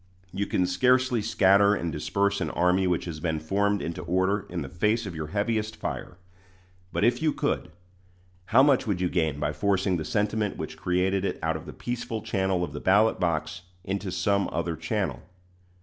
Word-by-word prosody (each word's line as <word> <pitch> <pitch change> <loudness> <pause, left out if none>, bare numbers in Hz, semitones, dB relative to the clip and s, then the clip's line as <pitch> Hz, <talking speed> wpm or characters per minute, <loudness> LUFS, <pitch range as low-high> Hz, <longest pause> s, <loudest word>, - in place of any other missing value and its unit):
You 100 +1 -2
can 90 - +1
scarcely 125 +6 +2
scatter 100 -1 +4
and 85 -4 -3
disperse 100 +6 0
an - - -1
army 90 +2 +2
which 90 -2 0
has 80 -3 -6
been 80 -1 -1
formed 100 +5 0
into 85 - -4
order 95 +3 0
in - - -3
the - - -6
face 105 +6 0
of 95 - -5
your 80 -2 -5
heaviest 110 +3 -1
fire; 90 - -5 0.7
but - - -1
if 120 +6 +3
you 155 -1 +3
could, - - -2 0.7
how 115 +7 +5
much 140 -4 +3
would 100 -4 0
you 90 -1 +1
gain 80 -5 0
by 75 0 -1
forcing 95 +3 +1
the 80 - -3
sentiment 105 +2 -1
which - - -5
created 95 +2 0
it 100 - -1
out - - +1
of - - -7
the - - -6
peaceful 120 -2 -4
channel 95 -5 0
of - - -4
the - - -5
ballot 105 +4 +3
box 80 -1 -1 0.2
into 95 0 -3
some 100 +2 +1
other 85 -2 -2
channel? 95 +5 -2
95 Hz, 190 wpm, -27 LUFS, 90-105 Hz, 0.7 s, how